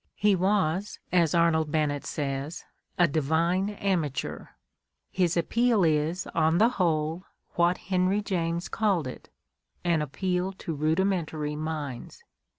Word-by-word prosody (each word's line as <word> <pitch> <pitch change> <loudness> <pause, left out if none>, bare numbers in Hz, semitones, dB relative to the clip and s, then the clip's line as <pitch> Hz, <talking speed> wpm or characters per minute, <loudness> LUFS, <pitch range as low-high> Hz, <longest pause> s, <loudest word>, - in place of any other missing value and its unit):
He 205 -1 +3
was, 190 0 0
as 170 -3 +3
Arnold 160 -2 +3
Bennett 150 -2 0
says, 140 +2 -3 0.3
a 175 - +5
"divine 165 +6 +1
amateur"; 175 -9 -2 0.6
his 180 -2 +1
appeal 230 +4 +2
is, 160 +2 +1
on 160 +1 +3
the 225 +5 +5
whole, 165 -5 0 0.3
what 175 0 +2
Henry 185 +2 0
James 170 -3 -1
called 200 -8 +1
it, 130 - -8 0.5
an 170 -3 +2
appeal 180 +5 -1
to 185 -3 -5
rudimentary 155 -1 0
minds. 150 - -5
170 Hz, 120 wpm, -27 LUFS, 155-190 Hz, 0.6 s, a